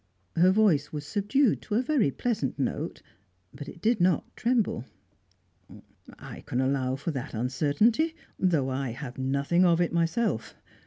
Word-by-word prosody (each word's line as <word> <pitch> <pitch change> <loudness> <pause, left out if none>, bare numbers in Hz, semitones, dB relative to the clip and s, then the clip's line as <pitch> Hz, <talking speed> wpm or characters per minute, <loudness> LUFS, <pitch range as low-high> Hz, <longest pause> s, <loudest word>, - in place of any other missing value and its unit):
Her 175 +2 +5
voice 190 -8 +3
was 150 -1 -5
subdued 210 - +1
to 210 - -4
a 240 - +2
very 260 - +2
pleasant 225 - -2
note, 135 - -3 0.5
but 140 +1 -8
it 170 - -13
did 225 -3 +2
not 175 -3 +1
tremble. 230 - 0 1.3
"I - - -10
can 125 - -1
allow 130 -1 0
for 145 +5 -3
that 130 -4 -5
uncertainty 150 - +1 0.2
though 160 -8 +2
I 130 -2 -2
have 125 0 -8
nothing 140 +7 +1
of 170 -2 +4
it 175 -1 +1
myself. 170 - 0
165 Hz, 150 wpm, -27 LUFS, 135-215 Hz, 1.3 s, Her